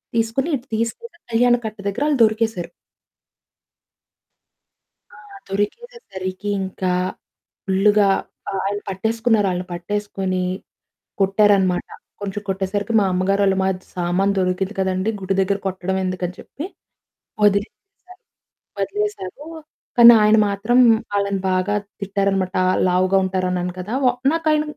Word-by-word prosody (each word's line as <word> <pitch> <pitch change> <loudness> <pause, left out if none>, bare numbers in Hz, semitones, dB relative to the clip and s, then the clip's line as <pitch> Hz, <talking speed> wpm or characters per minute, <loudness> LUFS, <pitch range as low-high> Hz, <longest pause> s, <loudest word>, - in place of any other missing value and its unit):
తీసుకొని 230 +7 0
ఇటు 250 +3 -18
తీసుకెళ్లి 340 - -4
కళ్యాణకట్ట 235 -2 +1
దగ్గర 205 +9 -2
ఆళ్లు 285 -4 +1
దొరికేశారు. 220 -4 -1 2.4
ఆ! - - -15 0.3
దొరికేసరికి 205 - -4
ఇంకా 190 -1 -2 0.7
ఫుల్‌గా 200 +1 +3 0.4
ఆ - - -5
ఆయన 205 +1 -1
పట్టేసుకున్నారు. 220 +2 +1
ఆళ్లని 180 0 -4
పట్టేసుకొని, 190 0 -3 0.8
కొట్టారన్నమాట. 195 -2 +3 0.3
కొంచెం 205 +1 -4
కొట్టేసరికి 195 +3 -2
మా - - +2
అమ్మగారోళమజ్ 190 0 +1
"సామాను 180 +3 +1
దొరికింది 185 +2 -1
కదండీ! 190 +3 0
గుడి 190 0 -1
దగ్గర 195 +1 +1
కొట్టడం 190 0 -2
ఎందుకని?" 180 -1 -3
చెప్పి 295 - -8 0.8
వదిలేశారు, 360 - -2 0.6
వదిలేశారు, 200 +4 -3 0.5
కానీ 235 0 +10
ఆయన 215 +1 +5
మాత్రం 215 +5 +1 0.4
ఆళ్లని 200 -1 0
బాగా 185 +3 0 0.3
తిట్టారన్నమాట. 195 -1 -1 0.3
లావుగా 185 +1 +2
ఉంటారన్నాను 180 -1 -1
కదా! 195 +5 -5
వ - - +6 0.3
నాకు 330 -1 -2
ఆయన 300 0 +2
200 Hz, 105 wpm, -21 LUFS, 185-220 Hz, 2.4 s, కానీ